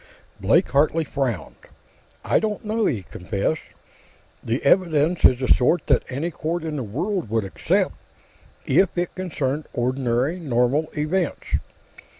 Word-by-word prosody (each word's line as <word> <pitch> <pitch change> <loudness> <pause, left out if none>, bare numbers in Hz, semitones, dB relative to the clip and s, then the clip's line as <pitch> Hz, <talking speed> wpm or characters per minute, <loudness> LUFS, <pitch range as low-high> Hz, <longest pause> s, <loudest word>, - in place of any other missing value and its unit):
Blake - - +3
Hartley 155 +3 +2
frowned. 135 -5 -3 0.7
"I - - +3
don't 215 -1 -3
know," 220 +1 +1
he 105 -8 -1
confessed. 100 - -2 0.8
"The 115 +3 -2
evidence 165 0 +3
is 125 - +7
the 130 - -1
sort 145 +8 +3
that 135 -4 +3
any 145 +7 -2
court 165 +2 -3
in 160 -2 -3
the 140 - -2
world 165 - -2
would 110 0 +1
accept, 95 - 0 0.7
if 190 -2 +2
it 175 0 -1
concerned 155 -5 -3
ordinary, 130 +5 0
normal 135 +1 +1
events. 165 +3 -1
150 Hz, 135 wpm, -23 LUFS, 125-175 Hz, 0.8 s, is